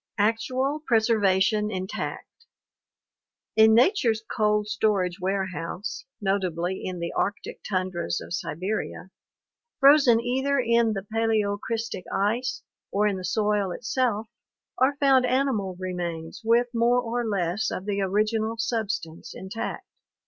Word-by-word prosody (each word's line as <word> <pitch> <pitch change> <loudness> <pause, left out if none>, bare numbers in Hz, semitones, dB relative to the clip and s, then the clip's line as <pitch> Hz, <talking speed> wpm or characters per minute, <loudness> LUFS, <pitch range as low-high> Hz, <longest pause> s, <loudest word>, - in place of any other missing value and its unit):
Actual 255 +7 0
Preservation 210 -3 +3
Intact. 190 -1 -6 0.5
— - - -66
In 220 0 +6
nature's 235 - +3
cold 210 -1 +2
storage 210 -4 0
ware 190 +1 0
house, 185 - -5
notably 190 -2 -1
in 185 -1 -4
the 170 0 -4
arctic 205 - -2
tundras 185 -3 -2
of - - -8
Siberia, 185 +3 -4 0.7
frozen 275 -4 +6
either 265 +4 0
in 235 -2 +3
the 195 -1 -5
paleocrystic 225 -1 -1
ice 240 +6 -1 0.3
or 205 +1 +1
in 205 -2 +1
the 185 - -7
soil 205 +1 +1
itself, 225 +1 -1 0.5
are 265 +3 +3
found 275 -3 +4
animal 245 -8 0
remains 175 -1 -4
with 235 +2 +3
more 240 +1 +3
or 240 0 -2
less 200 -1 -1
of 185 - -5
the 200 -1 -1
original 215 +3 0
substance 215 -8 -3
intact. 190 +4 -5
215 Hz, 120 wpm, -26 LUFS, 190-235 Hz, 0.7 s, In